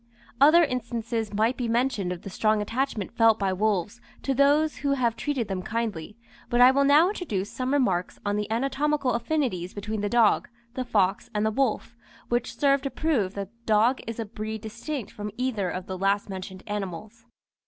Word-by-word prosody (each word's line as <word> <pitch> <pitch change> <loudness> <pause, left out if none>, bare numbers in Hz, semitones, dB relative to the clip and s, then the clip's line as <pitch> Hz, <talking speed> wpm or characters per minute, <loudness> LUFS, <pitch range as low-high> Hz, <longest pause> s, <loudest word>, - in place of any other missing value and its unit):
Other 315 +5 +7
instances 235 -4 -2
might 220 +4 +1
be 245 - -2
mentioned 230 -5 0
of 180 - -6
the 195 - -7
strong 215 +2 +2
attachment 230 -1 -2
felt 225 -2 +5
by 195 -2 0
wolves 210 +3 -1 0.2
to 275 - 0
those 290 +3 +3
who 280 -1 0
have 240 -4 +1
treated 275 -7 -2
them 190 -2 -3
kindly, 215 -2 -4 0.3
but 240 - +1
I 250 +1 +8
will 280 +1 +2
now 300 +6 +6
introduce 210 - -3
some 255 0 -3
remarks 195 -11 +1
on 205 0 0
the 210 0 -2
anatomical 275 +3 0
affinities 235 - -1
between 210 +1 -4
the 205 - -1
dog, 230 -1 +3 0.2
the 255 0 -3
fox, 195 -4 +1
and 210 +1 +1
the 220 - +2
wolf, 240 -1 -1 0.3
which 240 0 -1
serve 280 -1 +3
to 275 - -3
prove 255 -12 0
that 200 0 -5
the 235 0 -37
dog 220 +4 +3
is 230 - -5
of 225 - -3
a - - -28
breed 220 -1 -5
distinct 235 +2 -5
from 210 0 -6
either 235 -7 -1
of 185 +1 -5
the 185 -1 -6
last 200 +2 +1
mentioned 190 0 -7
animals. 210 +3 -6
225 Hz, 195 wpm, -26 LUFS, 205-260 Hz, 0.3 s, I